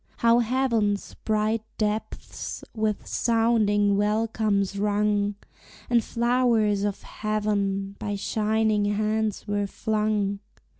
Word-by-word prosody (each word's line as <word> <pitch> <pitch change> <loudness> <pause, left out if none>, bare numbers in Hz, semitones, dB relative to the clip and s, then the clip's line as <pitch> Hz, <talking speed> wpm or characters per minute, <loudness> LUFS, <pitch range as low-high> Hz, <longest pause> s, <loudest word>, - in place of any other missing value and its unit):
How 235 0 +4
heaven's 230 -4 0
bright 215 +1 +1 0.2
depths 215 0 -3
with 215 -2 -1
sounding 215 -3 +2
welcomes 210 -2 0
rung, 205 0 +1 0.6
And 235 -1 +4
flowers 235 -4 +2
of 205 -1 -2
heaven 200 -2 -2
by 205 -1 -3
shining 215 +1 +1
hands 215 +1 -1
were 205 0 0
flung! 210 -2 -1
210 Hz, 95 wpm, -25 LUFS, 205-220 Hz, 0.6 s, How